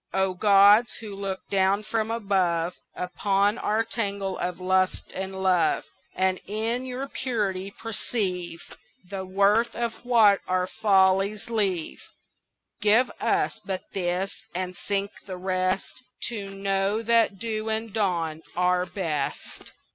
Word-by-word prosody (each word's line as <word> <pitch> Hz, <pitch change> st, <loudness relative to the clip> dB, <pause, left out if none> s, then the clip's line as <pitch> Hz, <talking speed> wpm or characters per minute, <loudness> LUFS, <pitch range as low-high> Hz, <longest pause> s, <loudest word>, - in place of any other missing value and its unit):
O 190 Hz, -1 st, +2 dB
gods, 205 Hz, +4 st, +6 dB
who 215 Hz, -3 st, -8 dB
look 195 Hz, -1 st, -5 dB
down 195 Hz, +1 st, +2 dB
from 220 Hz, 0 st, -1 dB
above 185 Hz, -6 st, +1 dB, 0.2 s
Upon 200 Hz, +4 st, +1 dB
our 215 Hz, +2 st, +1 dB
tangle 200 Hz, -4 st, -2 dB
of 180 Hz, 0 st, -3 dB
lust 185 Hz, 0 st, +1 dB
and 190 Hz, 0 st, -4 dB
love, 180 Hz, -4 st, +3 dB, 0.3 s
And, 185 Hz, 0 st, +1 dB
in 225 Hz, +5 st, -2 dB
your 255 Hz, +2 st, -4 dB
purity, 205 Hz, -8 st, -2 dB
perceive 195 Hz, -6 st, -4 dB, 0.4 s
The 190 Hz, 0 st, -5 dB
worth 200 Hz, +5 st, +2 dB
of 235 Hz, -1 st, -1 dB
what 225 Hz, -5 st, +5 dB
our 185 Hz, 0 st, +1 dB
follies 195 Hz, +1 st, +2 dB
leave: 195 Hz, -7 st, -1 dB, 0.8 s
Give 220 Hz, +5 st, +4 dB
us -, -, 0 dB
but 190 Hz, -1 st, -4 dB
this, 185 Hz, +1 st, -1 dB, 0.2 s
and 185 Hz, 0 st, -3 dB
sink 200 Hz, +1 st, -2 dB, 0.2 s
the 185 Hz, -2 st, -5 dB
rest 185 Hz, +4 st, -1 dB, 0.3 s
To 205 Hz, -4 st, -5 dB
know 195 Hz, +2 st, 0 dB
that 230 Hz, -3 st, +3 dB
dew 220 Hz, +1 st, -3 dB
and 220 Hz, -1 st, -2 dB
dawn 170 Hz, -7 st, 0 dB
are 180 Hz, 0 st, +2 dB
best. 165 Hz, -7 st, -4 dB
195 Hz, 125 wpm, -26 LUFS, 185-215 Hz, 0.8 s, gods